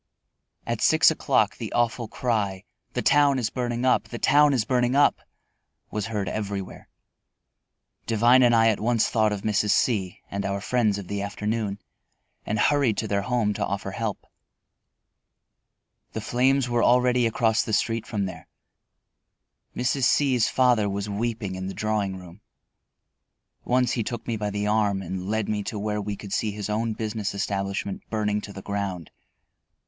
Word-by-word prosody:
At - - -3
six - - +5
o'clock - - +1
the - - -6
awful 120 0 0
cry, 105 -6 -2 0.3
"The - - -2
town 145 -2 +4
is 115 -3 -1
burning 120 -1 -2
up, 130 - +3
the 120 - -7
town 145 +4 +4
is 125 -5 +1
burning 125 0 +1
up!" 145 - +4 0.7
was 105 0 -3
heard 105 -4 -3
everywhere. 100 -1 -5 1.2
Devine 120 +3 +5
and 120 -2 +5
I 115 0 +5
at 110 - 0
once 115 0 +2
thought 110 -2 +2
of 100 -2 -4
Mrs. 105 -1 +1
C 100 -5 +1
and 100 0 -3
our 100 +1 -2
friends 110 -1 +1
of 100 -3 -7
the 100 +1 -3
afternoon, 105 0 -2 0.7
and 105 - -1
hurried 135 -2 +2
to 110 - -2
their 100 -1 0
home 115 -1 0
to - - -3
offer 100 0 -3
help. 105 +1 -4 1.9
The - - -3
flames 125 +4 +2
were 120 -1 +1
already 125 -1 +4
across 110 0 +2
the 115 - -4
street 115 +1 0
from 100 -3 -2
there. 90 -5 -8 1.3
Mrs. 125 +1 +1
C 135 0 +3
's 120 - +2
father 120 -5 +3
was 100 +1 -3
weeping 110 -2 -2
in 95 0 -5
the 95 - -6
drawing 105 -3 -1
room. 90 +2 -13 1.2
Once 125 0 +2
he 120 - 0
took 120 +1 -5
me 115 - -2
by 105 -1 -2
the 105 0 -2
arm 105 -2 +1
and 95 +1 -5
led 110 -1 -1
me 105 -1 -1
to 110 - -4
where 105 0 -2
we 105 0 -4
could 100 -1 -8
see 110 - 0
his 105 0 -5
own 110 +1 -1
business 110 -2 -3
establishment 100 0 -3
burning 105 -1 -1
to 105 - -9
the 95 -1 -9
ground. 100 -5 -4
110 Hz, 170 wpm, -25 LUFS, 100-120 Hz, 1.9 s, six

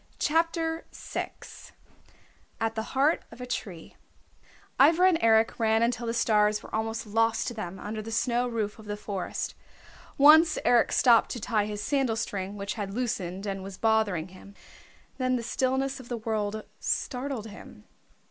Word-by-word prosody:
CHAPTER 325 +1 0
VI - - -5 1.3
AT 225 0 0
THE 220 - -2 0.2
HEART 290 +5 +3
OF 230 - -13
A 250 - -5
TREE 190 -9 -6 0.8
Ivra 330 +6 +6
and 335 -3 +1
Eric 225 +1 +3
ran 220 0 +3
until 235 0 -1
the 230 - -1
stars 210 -2 +2
were - - -13
almost 225 +1 -2
lost 225 +2 +1
to 240 - -3
them 190 -4 -6
under 215 +2 -5
the 220 - -8
snow 240 +2 +1
roof 220 -2 -3
of 215 - -12
the 205 0 -4
forest. 200 -3 -4 0.6
Once 310 +3 +7
Eric 240 -1 +4
stopped 235 -3 +5
to 245 - -5
tie 210 -2 0
his 210 -1 -5
sandal 270 -4 +1
string 200 -2 -4
which 200 0 -3
had 200 -2 -5
loosened 195 -6 -3
and 195 -1 -3
was 190 0 -8
bothering 215 -7 +1
him. 190 +2 -14 0.6
Then 255 0 +1
the 240 - -2
stillness 265 +3 -1
of 255 - -12
the 240 - -2
world 215 -1 -2 0.2
startled 255 -3 -2
him. 210 -2 -12
225 Hz, 165 wpm, -27 LUFS, 210-250 Hz, 1.3 s, Once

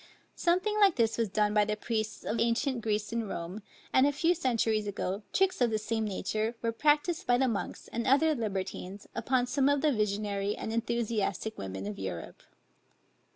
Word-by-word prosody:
Something 370 +5 +1
like 395 -4 +6
this 230 -2 +2
was 225 -3 +1
done 210 +1 +1
by 210 -1 +5
the 210 +1 -1
priests 220 -1 -3
of 220 +1 -2
ancient 235 +2 +1
Greece 210 0 -1
and 230 -3 -2
Rome; 175 +5 -5 0.3
and 260 +2 +6
a - - +3
few 330 +4 +2
centuries 230 -8 0
ago, 195 0 -2
tricks 380 -6 +2
of 245 - +4
the 220 - 0
same 220 +1 -1
nature 215 +3 -2
were 230 - +1
practiced 305 +7 +1
by 245 0 +4
the 265 +1 +2
monks, 225 -5 -3
and 235 0 -3
other 310 +4 +4
libertines, 200 -4 -4
upon 245 +2 +1
some 270 +2 +2
of 285 -1 +2
the 305 0 +3
visionary 205 -1 -1
and 220 - -4
enthusiastic 225 -2 -1
women 95 0 -5
of 105 -1 -5
Europe. 90 -4 -6
225 Hz, 185 wpm, -30 LUFS, 210-260 Hz, 0.3 s, like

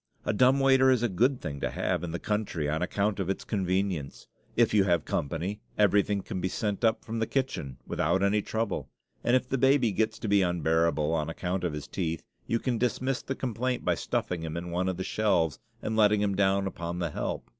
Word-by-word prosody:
A - - +1
dumb 130 +5 +4
waiter 135 -1 +5
is 125 -3 +3
a - - +4
good 120 +7 +2
thing 70 -2 -5
to - - -1
have - - -1
in 90 - -3
the 85 - -3
country, 100 -7 -2
on 80 +2 -1
account 100 +3 0
of 95 -1 -2
its 95 - -2
convenience. 95 -6 -2 0.3
If 115 -2 +3
you 105 -2 +5
have 85 -4 +2
company, 85 +8 -2 0.2
everything 105 -1 +3
can 95 - -4
be 95 - 0
sent 105 +3 -2
up 110 -1 +2
from 115 0 -3
the 110 - 0
kitchen 100 - -2
without 85 +5 +1
any 105 +1 +3
trouble; 110 +1 -2 0.3
and 120 - +3
if 130 0 +1
the 135 0 -1
baby 135 -3 +4
gets 110 +3 0
to - - -5
be 100 -1 +4
unbearable, 80 -3 +1
on 80 -1 0
account 90 +2 -3
of 85 -4 -1
his 75 -1 -6
teeth, 85 -3 -3 0.2
you 115 - +1
can 120 -1 -1
dismiss 125 +2 0
the 135 - -4
complainant 125 0 -2
by - - +3
stuffing 90 -2 -2
him 80 0 -4
in 85 +1 -5
one 90 +2 0
of 95 - -3
the 95 - -2
shelves 85 - +1 0.2
and 110 - -2
letting 105 -1 +4
him 100 -1 +1
down 95 0 +2
upon 85 -2 -4
the 85 -3 -2
help. - - -3
100 Hz, 220 wpm, -28 LUFS, 85-115 Hz, 0.3 s, waiter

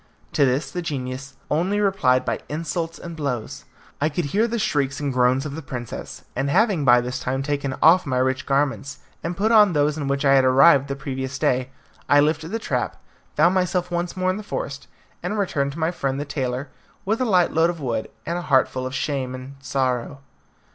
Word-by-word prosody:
To 140 - +4
this 135 +2 -1
the 180 - -3
genius 135 -3 -5 0.2
only 185 +7 +1
replied 140 -11 +2
by - - -1
insults 165 +2 -3
and 170 -1 -8
blows. 140 -7 -4 0.4
I 155 - +3
could 160 +2 -2
hear 210 +11 +1
the 235 0 -2
shrieks 140 -10 0
and 145 -2 -2
groans 125 +2 +2
of 145 - -5
the 160 - -5
princess, 125 -4 -7
and 135 +2 -1
having 195 -1 +3
by 120 -2 +6
this 125 +1 -4
time 135 +2 -2
taken 140 -2 -2
off 170 +1 +6
my 130 -2 0
rich 130 +2 0
garments 140 0 0 0.3
and 170 +1 -3
put 215 +3 +2
on 210 -4 +6
those 150 +1 +1
in 140 - -3
which 140 +1 0
I 135 - +6
had 135 -1 +5
arrived 135 +2 +6
the 140 - -3
previous 135 -1 -4
day, 130 -1 +1 0.4
I 145 - +6
lifted 155 +2 +1
the 225 - -2
trap, 130 - -2 0.4
found 170 +4 +4
myself 180 -1 0
once 175 +1 -2
more 185 0 +1
in 185 - -3
the - - -5
forest, 140 -9 -5 0.3
and 200 +5 -3
returned 140 -8 0
to - - -10
my 160 +1 +1
friend 135 -5 -2
the 145 - -3
tailor, 130 -1 -3 0.4
with 220 +5 0
a - - +2
light 180 -6 +3
load 160 +1 +4
of 170 -1 -4
wood 120 -6 -2 0.2
and 170 +1 -2
a - - -4
heart 135 -6 +3
full 130 0 -4
of 130 - -6
shame 130 -3 -2
and 130 +2 -9
sorrow. 135 0 -2
145 Hz, 215 wpm, -23 LUFS, 130-170 Hz, 0.4 s, by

